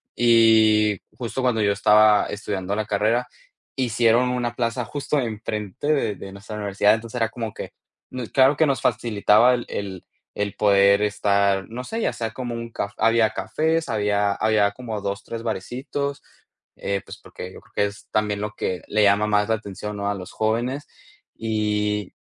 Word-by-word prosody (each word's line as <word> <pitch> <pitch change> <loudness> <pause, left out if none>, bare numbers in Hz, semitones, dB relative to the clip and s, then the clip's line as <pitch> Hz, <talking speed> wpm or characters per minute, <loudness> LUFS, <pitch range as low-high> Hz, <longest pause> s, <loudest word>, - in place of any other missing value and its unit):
y 110 -3 +4 0.2
justo 125 +1 -4
cuando 125 -3 +1
yo 100 - +3
estaba 105 0 +5
estudiando 100 -2 -3
la 110 0 -2
carrera 110 +4 +1 0.5
hicieron 120 -1 +2
una 120 -1 -1
plaza 115 0 -1
justo 145 +4 -2
enfrente 110 -1 -4
de 140 -8 +1
de 95 - -9
nuestra 105 +2 -9
universidad. 105 0 +2
Entonces 115 +2 -4
era 115 -1 +1
como 115 -1 -5
que, - - -7 0.6
claro 135 +2 +5
que 160 - +4
nos 135 -5 0
facilitaba 115 +1 +3
el 120 - -5
el 95 -3 -5 0.3
el 100 -1 -2
poder 100 -1 +4
estar, 100 -2 +1
no 120 +3 -6
sé, 225 - -4
ya - - +1
sea 115 -2 -4
como 120 0 -5
un 115 0 -6
caf 100 -2 -4
había 115 0 +3
cafés, 160 +1 -1
había 105 -2 +1
había 110 -2 +2
como 110 -2 -6
2, 100 +2 -4
3 115 -1 -6
barecitos. 130 +6 -4 0.5
Eh, 100 0 -2
pues, - - -10
porque 90 +1 -9
yo - - -12
creo - - -26
que 100 - +2
es 100 +1 -8
también 105 -1 0
lo 105 0 -4
que 90 -4 -3
le 105 0 +2
llama 100 +1 +4
más 105 -1 +2
la - - +3
atención, 105 0 -7
¿no?, 100 0 -2
a 100 - -1
los 90 -2 -8
jóvenes, 120 +6 -1 0.5
y 105 -2 -1
110 Hz, 175 wpm, -23 LUFS, 100-120 Hz, 0.6 s, estaba